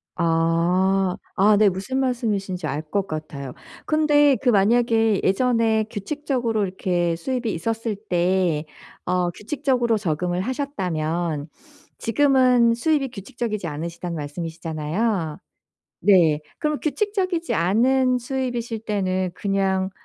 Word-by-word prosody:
아. 175 +3 +2 0.2
아 205 +2 +5
네. 210 -1 +5
무슨 195 +9 -3
말씀이신지 205 -9 -1
알 150 +2 -3
것 200 -1 0
같아요. 150 -5 -6 0.3
근데 295 -2 +4
그 255 - +2
만약에 225 0 +3
예전에 225 0 +2
규칙적으로 240 -1 -2
이렇게 180 -2 -1
수입이 240 +6 -2
있었을 225 +5 -2
때 180 -5 0 0.4
어 180 0 +1
규칙적으로 245 - 0
적응을 175 -2 -1
하셨다면 175 - -2 0.5
지금은 250 -2 +3
수입이 275 +2 +1
규칙적이지 215 -3 -4
않으시다는 170 +3 -5
말씀이시잖아요. 160 +3 -3 0.6
네. 170 -6 +5 0.2
그럼 300 -1 -1
규칙적이지 370 0 -1
않은 250 +8 +2
수입이실 245 -3 -3
때는 185 -3 -1
그냥 195 -1 0
200 Hz, 280 characters per minute, -23 LUFS, 175-245 Hz, 0.6 s, 아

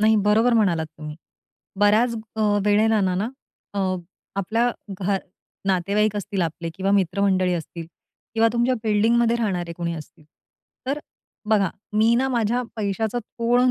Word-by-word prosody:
नाही, 220 +1 +5
बरोबर 215 +4 +3
म्हणालात 175 -8 +2
तुम्ही. 150 0 -7 0.6
बऱ्याच 220 +4 +4 0.2
अ, - - -1 0.2
वेळेलाना 210 -2 +3
ना, 205 +5 -1 0.5
अ, - - -2 0.6
आपल्या 225 +5 +1 0.3
घर 195 +1 +1 0.5
नातेवाईक 200 +3 +1
असतील 195 -2 -2
आपले 165 +1 -3
किंवा 195 +1 -1
मित्रमंडळी 190 -1 +2
असतील 165 0 -6 0.5
किंवा 225 0 +4
तुमच्या 240 +2 +2
बिल्डिंगमध्ये 230 +2 +3
राहणारे 180 -7 -1
कोणी 170 -1 -2
असतील, 155 -1 -11 0.6
तर 280 +3 0 0.5
बघा, 200 -5 +3 0.2
मी 220 +2 +4
ना, 265 +2 +2
माझ्या 240 0 +1
पैशाचं 215 +3 -1
थोडं 240 +2 +1
210 Hz, 130 wpm, -23 LUFS, 185-230 Hz, 0.6 s, नाही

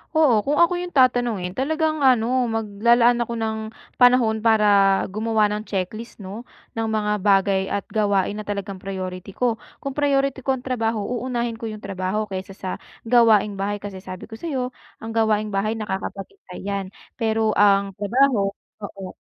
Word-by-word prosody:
Oo. 305 -7 +5
Kung 290 +1 +1
ako 340 +1 +5
yung 360 - -6
tatanungin 240 -8 +2
talagang 310 +2 0
ano, 250 0 +3
maglalaan 235 +3 +3
ako 235 - -6
ng 220 -1 -1 0.4
panahon 245 -3 +4
para 220 -2 +4 0.4
gumawa 215 +1 +1
ng 210 0 -3
checklist 215 +4 -5
'no, 205 +4 -7 0.3
ng 225 0 -1
mga 210 -1 0
bagay 195 -1 +3
at 200 - -2
gawain 205 -2 +1
na 215 - -5
talagang 200 -1 -4
priority 185 -1 -6
ko. 240 +3 0 0.2
Kung 275 -2 -5
priority 275 -2 +1
ko 265 +1 +1
ang 250 - -12
trabaho, 225 -3 0
uunahin 240 0 -2
ko 225 0 -6
yung 215 0 -9
trabaho 195 +2 -2
kaysa 190 0 -6
sa 190 - -6 0.4
gawaing 225 -4 +4
bahay, 200 +1 -2
kasi 195 -2 -8
sabi 185 -2 -8
ko 220 - -9
sa'yo 260 -2 -3 0.3
ang 225 - -7
gawaing 215 -1 +2
bahay 210 +3 0
nakakapaghintay 195 -2 -6
'yan 200 0 -2 0.3
pero 220 -2 0
ang 200 -1 +3
trabaho 210 0 +2 0.3
oo. 195 -2 -7
220 Hz, 160 wpm, -22 LUFS, 200-245 Hz, 0.4 s, Oo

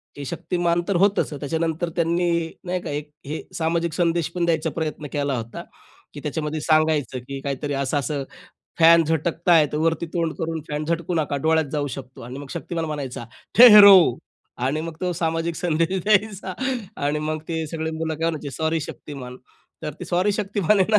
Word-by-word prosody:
की 145 - -7
शक्तिमान 175 +2 -1
तर 200 - 0
होतच, 200 -3 +2
त्याच्यानंतर 160 +3 -1
त्यांनी 170 +1 +1 0.4
नाही 180 0 -2
का - - -6
एक 145 +1 -4
अ, 150 -1 -22
हे 155 - -3 0.2
सामाजिक 165 0 0
संदेश 170 -1 +1
पण 175 -1 +1
द्यायचा 165 -2 +1
प्रयत्न 155 -2 -3
केला 140 -2 0
होता, 115 0 -6 0.5
की 145 - -8
त्याच्यामध्ये 150 +1 -3
सांगायचं 155 -5 +2
की 140 0 -5
काहीतरी 140 +1 -3
असं-असं 140 +1 -1 0.6
फॅन 165 0 +7
झटकत 165 +2 -2
आहे, 160 -3 +6
वरती 165 +2 0
तोंड 165 -2 0
करून 165 0 -2
फॅन 150 +1 -3
झटकू 170 +2 -2
नका 150 -3 0
डोळ्यात 160 0 +3
जाऊ 145 -2 -1
शकतो 130 0 -9
आणि 125 +3 -8
मग 140 -1 -9
शक्तिमान 165 -2 -4
म्हणायचा, 140 -6 -5 0.3
"ठहरो." 210 -5 +11 0.7
आणि 145 +4 0
मग 165 0 -6
तो 180 -1 0
सामाजिक 165 0 -1
संदेश 170 +2 0
द्यायचा 205 -2 +1 0.5
आणि 145 +1 +1
मग 155 +1 -2
ते 160 -1 -2
सगळे 160 0 -3
मुलं 160 0 -3
काय 165 +2 0
म्हणायचे, 150 -3 -6
"सॉरी 160 0 0
शक्तिमान." 135 -4 -8 0.5
तर 150 - -4
ते - - -4
सॉरी 185 +4 +1
शक्तिमान 205 -1 +1
आहे 210 +3 +4
ना, - - +6
160 Hz, 175 wpm, -23 LUFS, 150-170 Hz, 0.7 s, ठहरो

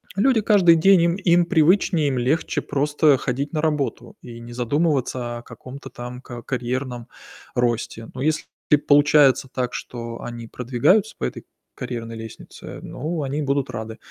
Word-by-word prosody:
Люди 225 +3 +3
каждый 190 -5 +5
день 185 +2 +5
им 170 0 +2
им 175 -3 +3
привычнее, 170 -2 +3
им 130 - -1
легче 135 +7 0
просто 145 0 +2
ходить 135 +4 -3
на 155 - 0
работу 150 -3 -2
и 120 -1 -10
не 120 +1 -10
задумываться 125 -2 -1
о - - -8
каком-то 130 +3 -11
там 125 +1 -8
ка 120 -2 -9
карьерном 125 -1 -3 0.5
росте. 120 -2 -1
Но 130 - -5
если 155 +2 0 0.4
получается 145 -2 +5
так, 125 -1 -2
что 115 -1 -6
они 120 -1 -7
продвигаются 125 - +1
по - - -8
этой - - -4 0.3
карьерной 115 -2 -5
лестнице, 110 0 -10
ну 160 +1 -4
они 140 +2 -2
будут 140 -1 0
рады. 110 0 -6
135 Hz, 155 wpm, -22 LUFS, 120-155 Hz, 0.5 s, каждый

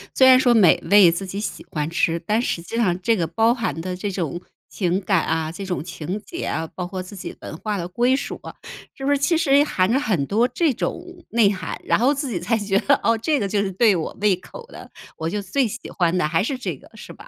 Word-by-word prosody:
虽 260 - +6
然 255 0 +8
说 245 -2 +4
美 200 -7 +5
味 200 -4 +7
自 190 +3 -4
己 195 +2 -5
喜 210 - -5
欢 150 0 -2
吃， 170 0 0
但 215 +3 +1
实 170 - -2
际 225 - -8
上 180 -6 +1
这 225 +4 +2
个 170 -4 -1
包 225 +8 +2
含 225 - -3
的 180 +1 -4
这 200 +2 -4
种 175 -2 -3 0.3
情 185 -1 -1
感 190 -3 +1
啊、 160 0 -1
这 195 +3 -7
种 180 -4 -3
情 180 +3 -5
结 345 - -6
啊， 160 - -2
包 180 -1 -4
括 185 -1 -5
自 200 +2 -11
己 190 - -7
文 - - -7
化 210 +1 -3
的 175 -1 -4
归 245 +8 +2
属 280 - -5
啊， - - -9 0.4
是 270 - -6
不 285 - +2
是 285 - +3
其 320 +4 +2
实 285 -3 +4
含 190 -7 +1
着 265 - +3
很 185 - 0
多 225 - +2
这 285 +3 +1
种 345 - -3 0.3
内 220 -3 +4
涵， 185 - -5
然 - - +2
后 265 +5 +3
自 280 -2 -3
己 175 - -2
才 225 +6 0
觉 200 -2 +1
得， 280 - +2
哦， 230 - +3
这 295 +5 0
个 200 - -1
就 200 0 0
是 195 -1 -2
对 210 0 +4
我 160 - -4
胃 205 -3 +4
口 460 - -12
的， - - -12 0.3
我 160 +1 -2
就 205 +2 -3
最 260 +5 0
喜 - - -8
欢 175 -1 +1
的 150 - +1
还 165 +4 +1
是 260 +2 -2
这 - - -4
个 - - -18
是 - - -10
吧？ - - -14
200 Hz, 280 characters per minute, -22 LUFS, 180-240 Hz, 0.4 s, 然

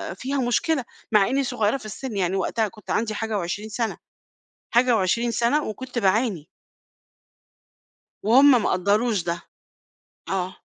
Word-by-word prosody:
فيها 275 +2 -3
مشكلة، 255 +3 +1 0.3
مع 205 -2 +5
إني 275 +2 +1
صغيرة 245 -1 0
في 220 - -13
السن 215 +1 -6
يعني 185 0 0
وقتها 220 +3 0
كنت 210 0 -16
عندي 220 -1 0
حاجة 220 -1 -2
و20 200 +4 -4
سنة، 225 +1 -2 0.7
حاجة 240 0 +4
و20 230 +5 +1
سنة 240 +6 +1
وكنت 250 +3 -5
باعاني. 200 - +1 1.8
وهُم 270 +6 +7
ما - - +1
قدَّروش 205 +4 +1
ده. 170 - 0 0.9
آه. 190 -1 -3
220 Hz, 135 wpm, -24 LUFS, 200-245 Hz, 1.8 s, وهُم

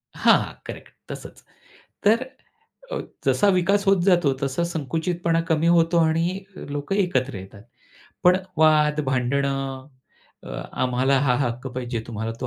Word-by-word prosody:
हां, - - +3
करेक्ट - - -9 0.2
तसंच. - - -9 0.6
तर 220 +4 +4 0.7
अ, - - -2 0.3
जसा 205 - +3
विकास 195 +3 +2
होत 195 -2 +4
जातो 175 -7 +3
तसा 135 +5 -1
संकुचितपणा 165 +1 -1
कमी 160 0 +2
होतो 170 0 +4
आणि 165 +4 +1
लोकं 145 +5 -4
एकत्र 140 - 0
येतात. 95 +2 -11 0.6
पण 180 +1 +6 0.2
वाद, 155 -1 +4
भांडणं 135 +1 -1 0.6
अ, - - -10 0.2
आम्हाला 130 +2 +1
हा 130 -3 +2
हक्क 120 +2 -5
पाहिजे. 125 -2 -4
तुम्हाला 110 0 -4
तो 130 - -2
150 Hz, 130 wpm, -23 LUFS, 130-175 Hz, 0.7 s, पण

